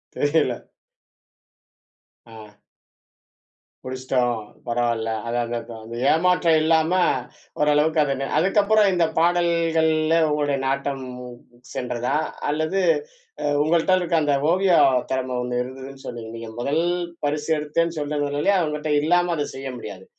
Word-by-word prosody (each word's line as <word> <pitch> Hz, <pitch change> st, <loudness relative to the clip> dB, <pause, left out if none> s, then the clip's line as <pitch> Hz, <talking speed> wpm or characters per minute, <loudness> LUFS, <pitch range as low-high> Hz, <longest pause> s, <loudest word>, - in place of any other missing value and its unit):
தெரியல. 145 Hz, -4 st, +1 dB, 1.6 s
ஆ. 110 Hz, -2 st, -13 dB, 1.3 s
முடிச்சிட்டோம் 130 Hz, -2 st, -1 dB, 0.3 s
பரவால்ல. 120 Hz, -1 st, 0 dB, 0.2 s
அது 120 Hz, +1 st, -1 dB
அது 120 Hz, +1 st, -4 dB
அதன் 115 Hz, -1 st, -11 dB, 0.2 s
ஏமாற்ற 180 Hz, +2 st, +2 dB
இல்லாம 160 Hz, +1 st, +2 dB, 0.7 s
ஓரளவுக்கு 150 Hz, +2 st, +3 dB
அத 140 Hz, -2 st, 0 dB, 0.2 s
அதுக்கப்புறம் 205 Hz, +4 st, +3 dB
இந்த 175 Hz, -2 st, +3 dB
பாடல்கள்ல 165 Hz, -2 st, +2 dB
உங்களுடைய 145 Hz, -2 st, 0 dB
நாட்டம் 135 Hz, 0 st, -2 dB, 0.7 s
சென்றதா? 125 Hz, +2 st, -2 dB, 0.3 s
அல்லது 155 Hz, +5 st, 0 dB, 0.8 s
உங்கள்ட்ட 165 Hz, +4 st, +2 dB
இருக்க 170 Hz, -1 st, -1 dB
அந்த 145 Hz, -1 st, +2 dB, 0.2 s
ஓவிய 185 Hz, +1 st, +3 dB, 0.4 s
திறம 130 Hz, -1 st, -1 dB
ஒண்ணு 125 Hz, 0 st, -1 dB
இருந்ததுன்னு 135 Hz, +1 st, -8 dB
சொன்னீங்க. 115 Hz, -2 st, -7 dB
நீங்க 115 Hz, -1 st, -7 dB
முதல் 140 Hz, +6 st, 0 dB, 0.4 s
பரிசு 150 Hz, +2 st, -2 dB
எடுத்தேன்னு 165 Hz, +3 st, -1 dB
சொல்றது, 145 Hz, 0 st, -2 dB, 0.4 s
உங்கிட்ட 150 Hz, 0 st, -4 dB
இல்லாம 175 Hz, +3 st, +2 dB
அத 145 Hz, -2 st, -1 dB
செய்ய 135 Hz, 0 st, -6 dB
முடியாது. 95 Hz, -5 st, -9 dB
150 Hz, 105 wpm, -23 LUFS, 125-165 Hz, 1.6 s, ஓரளவுக்கு